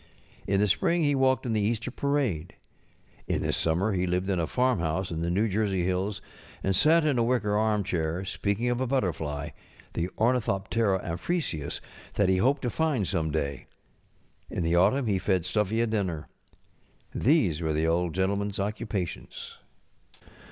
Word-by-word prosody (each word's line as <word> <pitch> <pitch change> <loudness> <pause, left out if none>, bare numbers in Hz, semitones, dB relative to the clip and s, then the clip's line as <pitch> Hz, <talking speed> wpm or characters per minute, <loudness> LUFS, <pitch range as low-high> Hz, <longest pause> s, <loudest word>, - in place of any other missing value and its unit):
In 100 0 +2
the 105 - +3
spring 170 - +2
he 145 -1 +3
walked 130 -1 +2
in 115 - -1
the 110 - +1
Easter 115 +3 -1
parade. 130 - -1 0.7
In - - 0
the - - 0
summer 90 +6 +1
ho 90 - 0
lived 90 +2 0
at 90 - 0
a 80 - 0
farmhouse 95 -9 0
in 80 0 -3
the 85 - -1
New 100 +6 +2
Jersey 100 -3 0
hills, 95 +2 -1 0.4
and 95 0 +1
sat 160 - +5
in 140 -5 +2
a - - +3
wicker 115 -4 +1
armchair, 95 -5 0
speaking 100 +4 -1
of 120 +1 -1
a 130 - 0
but┬¼ 135 +1 +2
terfly, 75 -4 -3 0.4
the 85 - -1
ornithoptcra 105 -4 +1
amphrisius, 85 - -2 0.3
that 100 -2 +3
he 95 - +3
hoped 135 +8 +2
to 140 +7 -1
And 135 - +1
some 80 -1 0
day. 70 -3 -3 0.8
In 90 - -2
the 85 +1 +2
autumn 105 +10 +3
he 100 -4 +1
fed 90 -3 +1
Stuffy 105 +3 +1
a - - +3
dinner. 95 -8 -2 0.9
These 110 - +2
were 80 -1 0
the 80 +1 +1
Old 85 0 +1
GentlemanŌĆÖs 100 +2 0
occupations. 105 -3 -4
100 Hz, 165 wpm, -28 LUFS, 85-120 Hz, 0.9 s, sat